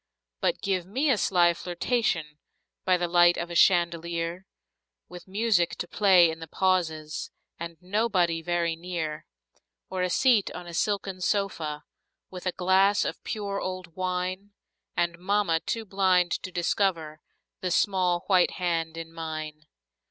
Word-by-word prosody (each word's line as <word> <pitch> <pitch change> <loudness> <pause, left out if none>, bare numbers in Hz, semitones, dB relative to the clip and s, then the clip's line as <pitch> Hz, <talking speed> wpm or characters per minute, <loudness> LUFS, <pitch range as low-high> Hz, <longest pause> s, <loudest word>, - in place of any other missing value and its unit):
But - - -1
give 185 -4 -1
me 270 +9 +1
a 240 - +3
sly 175 -2 +4
flirtation 170 -3 -2 0.5
By 185 -1 +4
the 175 0 -1
light 175 0 +5
of 170 0 -4
a - - -5
chandelier 170 0 +2 0.6
With 180 +1 -11
music 200 -3 +1
to 175 - -5
play 185 -5 +5
in 160 - -8
the 165 - -8
pauses, 160 -4 -1 0.3
And 170 0 -6
nobody 180 -4 +1
very 170 0 0
near; 165 -3 -5 0.6
Or 185 -1 -2
a 180 - +1
seat 230 +1 +3
on 180 - -7
a 170 - -9
silken 195 0 -1
sofa, 165 -7 -1 0.5
With 185 0 -6
a - - +2
glass 190 +3 +3
of - - -5
pure 200 -2 -3
old 185 -3 -5
wine, 185 +2 -3 0.4
And 170 0 0
mamma 190 -3 +1
too 225 +6 -3
blind 185 -3 +2
to 185 - -3
discover 170 -3 -1 0.4
The 185 - -2
small 180 -1 +2
white 185 -1 +3
hand 165 -3 -1
in 165 0 -7
mine. 155 -2 -6
180 Hz, 145 wpm, -27 LUFS, 170-190 Hz, 0.6 s, light